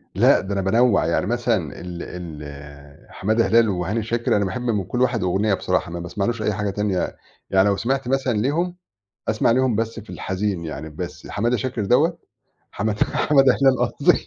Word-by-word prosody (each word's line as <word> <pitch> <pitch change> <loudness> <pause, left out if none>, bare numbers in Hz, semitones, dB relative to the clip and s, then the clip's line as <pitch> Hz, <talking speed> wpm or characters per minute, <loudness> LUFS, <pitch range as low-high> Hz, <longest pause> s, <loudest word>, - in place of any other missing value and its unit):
لأ، - - +5
ده 100 - -4
أنا 100 - 0
بانوّع، 110 +2 +3
يعني 85 - +1
مثلًا 115 - -1
ال 90 0 -7
ال 75 -4 -10
حمادة 110 +4 +1
هلال 115 -1 +4
وهاني 95 +4 -1
شاكر، 115 +2 0
أنا 100 - +1
باحب 95 +6 -3
من 115 -5 0
كلّ 125 +7 -3
واحد 120 -4 +1
أُغنية 100 +3 +1
بصراحة، 90 - -1
ما 85 - -5
باسمعلوش 105 +6 -2
أي 105 -1 0
حاجة 105 0 -2
تانية 100 -2 -1 0.3
يعني 95 +1 +4
لو 100 - +1
سمِعت 130 +4 -1
مثلًا 130 -1 +1
ليهم، 160 +10 0 0.5
أسمَع 110 +1 +2
ليهم 130 -1 +2
بس 115 +1 -2
في 110 - -14
الحزين 95 -2 -3
يعني 80 0 -6
بس، 75 - -7
حمادة 120 +4 0
شاكر 115 -2 -2
دَوّة 160 - +3 0.6
حماد 105 0 -1
حمادة 135 -3 +3
هلال 135 -1 +3
قصْدي - - +2
105 Hz, 180 wpm, -22 LUFS, 95-120 Hz, 0.6 s, لأ